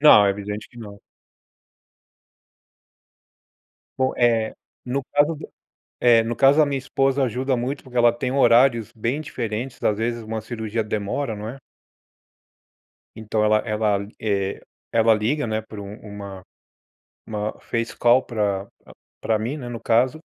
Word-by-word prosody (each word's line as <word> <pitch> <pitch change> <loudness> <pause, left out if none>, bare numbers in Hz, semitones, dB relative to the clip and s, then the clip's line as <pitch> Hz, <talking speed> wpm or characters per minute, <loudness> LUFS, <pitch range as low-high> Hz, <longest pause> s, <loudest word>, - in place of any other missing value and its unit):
não, 105 -9 +8
é - - +4
evidente 105 +1 -5
que - - -21
não. 100 -3 -10 3.0
Bom, 130 0 +2
eh, 115 -2 +2 0.3
no 130 +2 -2
caso 145 +3 +3
do 155 - -10 0.5
eh, 115 -2 +6
no 120 +1 -2
caso 140 +4 +5
a 155 - +6
minha 140 -1 -1
esposa 135 0 +1
ajuda 130 +2 0
muito 125 +4 -3
porque 125 -2 -14
ela 120 0 +6
tem 125 +2 -3
horários 120 -3 +4
bem 120 +7 -2
diferentes, 120 -3 -4
às 105 - +3
vezes 115 0 -2
uma 110 0 -4
cirurgia 110 0 -3
demora, 110 +4 -2
não 105 +1 -6
é. 130 - -8 1.6
Então 110 0 -1
ela 105 0 +4
ela, 105 -2 0 0.2
eh, 100 -2 -1 0.3
ela 115 0 +5
liga, 120 +6 0
né, 110 0 -1
por 110 -1 -10
um 100 0 -7
uma 100 -2 -9 0.8
uma 105 -1 -3
uma - - -21
face 115 -1 -3
call 120 +2 +5
pra 100 -4 -1 0.2
pra - - -16 0.3
pra 110 -1 +1
mim, 120 +8 -3
né, 125 -4 -7
no 120 -2 -6
caso, 125 +6 +2
115 Hz, 155 wpm, -23 LUFS, 105-130 Hz, 3.0 s, não